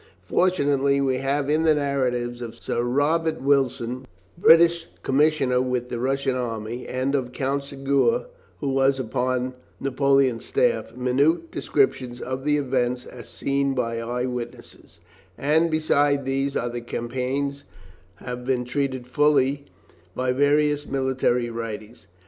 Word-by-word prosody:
Fortunately, 140 -6 +2
we 135 -2 +1
have 140 +2 -1
in 155 +2 +2
the 160 -1 +4
narratives 125 -4 -1
of 115 -2 -6
Sir - - -2
Robert 150 +6 +1
Wilson, 130 -2 0 0.3
British 170 0 +5 0.2
commissioner 135 -3 +2
with 125 -1 -2
the 120 - -4
Russian 135 +1 0
army, 115 -1 -4
and 130 +2 -1
of 130 -3 -1
Count 140 +2 -1
Segur, 140 - 0 0.4
who 140 - -1
was 135 0 +2
upon 125 +1 -1 0.3
Napoleon's 135 -2 +2
staff, 480 - 0
minute 140 - +1
descriptions 130 - 0
of 130 +2 -5
the 150 0 +3
events 125 -3 -1
as 120 -2 -11
seen 140 0 -1
by 115 -2 -1
eye 120 +2 -2
witnesses, 120 -7 -8 0.4
and 160 +4 +2
besides 145 -3 +2
these 135 +1 -1
the 120 0 -2
campaign 130 +4 -2 0.6
has 125 +4 -6
been 125 0 -1
treated 130 -1 -2
fully 140 0 +2 0.5
by 130 0 0
various 145 +2 +2
military 130 -3 0
writers. 115 -1 -7
135 Hz, 130 wpm, -24 LUFS, 125-145 Hz, 0.6 s, British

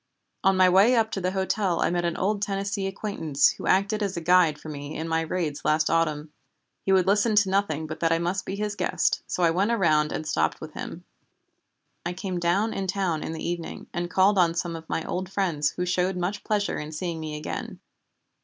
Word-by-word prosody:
On 195 0 +4
my 185 0 +6
way 195 +7 +5
up 220 -1 +2
to 195 - -3
the 180 - 0
hotel 190 -2 0
I - - +2
met 175 0 0
an 170 -1 -1
old 200 +2 0
Tennessee 200 0 -2
acquaintance 190 -7 +1
who - - -7
acted 200 +3 +2
as 195 -3 -2
a - - 0
guide 165 -3 +4
for - - -11
me 145 0 -6
in 160 - -4
my 165 0 +1
raids 160 -3 -3
last 155 +1 +2
autumn. 155 -2 0 0.5
He 195 - 0
would 190 -2 +4
listen 205 +3 +3
to 205 -2 +4
nothing 175 -6 0
but 155 0 -6
that 165 -1 +1
I 165 - +4
must 175 +3 -1
be 195 - -4
his 210 0 -3
guest, - - 0
so 180 - -1
I 165 - +5
went 190 +6 +1
around 155 -9 +2
and 155 - -4
stopped 80 - 0
with - - -9
him. - - -7 1.0
I 175 - -3
came 185 -1 -4
down 195 +6 +1
in 195 -1 -3
town 185 -5 -1
in - - -4
the 160 - -5
evening, 170 -1 -5
and 175 0 -2
called 190 +2 +4
on 170 -2 +3
some 170 -1 -2
of 160 0 -10
my 165 - -1
old 185 +1 -4
friends 170 -7 +1
who 180 - -1
showed 180 +1 0
much 185 +4 -2
pleasure 210 -1 0
in 150 +1 -6
seeing 165 +1 -4
me 155 -1 -5
again. 150 - -6
180 Hz, 225 wpm, -26 LUFS, 160-195 Hz, 1.0 s, my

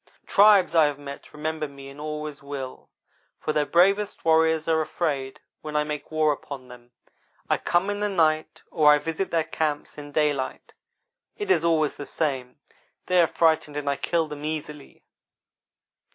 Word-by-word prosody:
'Tribes 200 -4 +5
I 160 -2 +6
have 145 -1 -3
met 140 -1 -10
remember 155 0 -3
me 140 -1 -12
and 140 +2 -11
always 150 -1 -5
will, 140 -2 -7 0.5
for 155 - -2
their 150 -1 +1
bravest 195 +4 +2
warriors 160 -1 +3
are 160 -1 +3
afraid 140 -5 -2 0.2
when 150 -1 -7
I 150 - +3
make 150 -1 -5
war 155 -1 +2
upon 135 -3 -7
them. 120 -1 -14 0.6
I - - +1
come 175 +2 +1
in 205 - -3
the 210 0 0
night 155 -4 +1
or 150 -3 +5
I 150 - +6
visit 165 +5 -3
their 165 -1 +1
camps 155 -2 -3
in 145 0 -9
daylight. 145 -3 -1 0.6
It 410 -2 -1
is - - +3
always 160 -3 +1
the 145 - -6
same; 130 -5 -2 0.5
they 180 -1 +4
are 165 - +4
frightened 160 -3 +1
and 145 -1 -4
I 140 - +2
kill 165 +2 0
them 150 -1 -8
easily.' 150 -2 -6
155 Hz, 170 wpm, -25 LUFS, 145-165 Hz, 0.6 s, I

